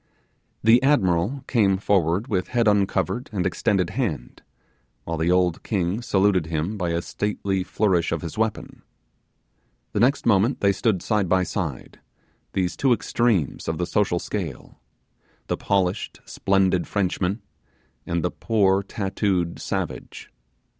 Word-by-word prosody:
The 115 +3 +6
admiral 125 - +2
came 100 -6 +2
forward 95 +1 +1
with 95 -7 -1
head 120 -2 +1
uncovered 100 +2 +1
and 95 -4 -1
extended 95 -1 0
hand, 110 - -3 0.6
while 85 - -3
the 80 +2 0
old 90 -2 +2
king 95 +1 -1
saluted 95 -7 +2
him 80 +6 -2
by 90 -4 -2
a 85 0 -1
stately 100 -2 -2
flourish 95 -2 +1
of 85 -1 -2
his 85 - -6
weapon. 110 -1 -3 1.1
The - - -1
next 135 +4 +2
moment 115 +4 +3
they 100 - +3
stood 100 -2 0
side 105 -5 0
by 95 0 +3
side, - - -4 0.5
these 90 -2 -1
two 135 -3 +3
extremes 110 - 0
of 80 0 -1
the 90 - -1
social 95 -1 +1
scale, 85 -6 -5 0.7
the - - -1
polished, 95 -2 -1
splendid 95 -2 +1
Frenchman, 95 +1 -1 0.6
and 85 -1 -2
the 90 - 0
poor 100 -4 +2
tattooed 95 -4 -1
savage. - - -5
95 Hz, 135 wpm, -24 LUFS, 90-105 Hz, 1.1 s, The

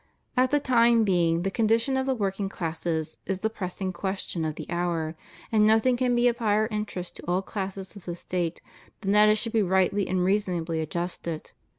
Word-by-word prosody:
At 255 +1 +4
the 290 +2 +3
time 235 -4 +4
being, 170 -4 +2
the 195 - -1
condition 230 +5 +2
of 265 0 0
the 265 - +2
working 195 -2 -1
classes 160 -2 -3
is 195 - 0
the 220 - 0
pressing 185 -2 -4
question 190 -2 -3
of 155 -1 -2
the - - -7
hour; 170 -2 -1 0.4
and 215 -2 +4
nothing 220 +4 +4
can 245 0 +1
be 240 +1 +4
of 240 0 +1
higher 215 -1 +2
interest 210 -4 -4
to - - -11
all 180 +2 +1
classes 195 -1 -5
of 200 - -12
the 175 - -4
State 175 -1 -3 0.4
than 195 -2 0
that 210 +1 +6
it 215 - +5
should 230 +2 -3
be 225 - +4
rightly 190 +1 +2
and 185 -1 +1
reasonably 180 -5 0
adjusted. 170 0 -4
195 Hz, 200 wpm, -27 LUFS, 175-220 Hz, 0.4 s, that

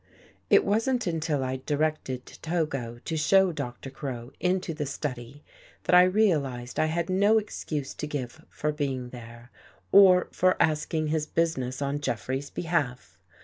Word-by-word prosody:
It - - +5
wasn't 225 +4 +1
until 160 -5 -1
I'd 130 0 -3
directed 150 -4 -1 0.2
Togo 145 -8 -2
to 165 - -2
show 190 +4 +4
Doctor 135 -3 -6
Crow 125 -3 -6
Into 180 -1 0
the 150 -2 -3
study, 135 -1 -5 0.4
that - - 0
I 180 - +9
realized 150 - +1
I 155 - +3
had 165 +1 -1
no 200 +4 +4
excuse 155 -9 -3
to 150 - -5
give 145 +1 -5
for 150 - -2
being 135 -4 -3
there, 120 0 -11 0.4
or 185 -2 +7
for 185 0 +2
asking 155 0 +1
his 155 -1 0
business 145 -5 -1
on 140 +1 -1
Jeffrey's 130 +1 -3
behalf. 155 -7 -2
150 Hz, 145 wpm, -27 LUFS, 130-170 Hz, 0.4 s, I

